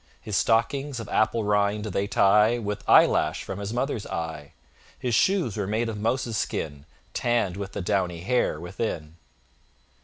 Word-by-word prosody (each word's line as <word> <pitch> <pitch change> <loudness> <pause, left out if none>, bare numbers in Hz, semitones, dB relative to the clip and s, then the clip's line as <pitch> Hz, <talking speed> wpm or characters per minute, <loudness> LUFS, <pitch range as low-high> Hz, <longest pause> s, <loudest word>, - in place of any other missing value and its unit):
His 105 - -5
stockings, 120 +6 +1
of 115 - -6
apple 110 +1 +1
rind, 105 0 +1
they 100 -1 -1
tie 105 +4 +4
With 105 -3 -4
eyelash - - +4
from 95 - -6
his 100 0 -4
mother's 120 -2 -2
eye: 80 -3 -5 0.4
His 125 -2 -2
shoes 170 - +2
were 100 -2 -2
made 110 +3 0
of 105 -2 -5
mouse's 115 0 -1
skin, 75 -6 -3 0.3
Tann'd 115 -7 0
with 100 0 -6
the 100 - -4
downy 90 -3 -1
hair 100 -5 0
within. 85 -3 -5
105 Hz, 155 wpm, -26 LUFS, 95-115 Hz, 0.4 s, tie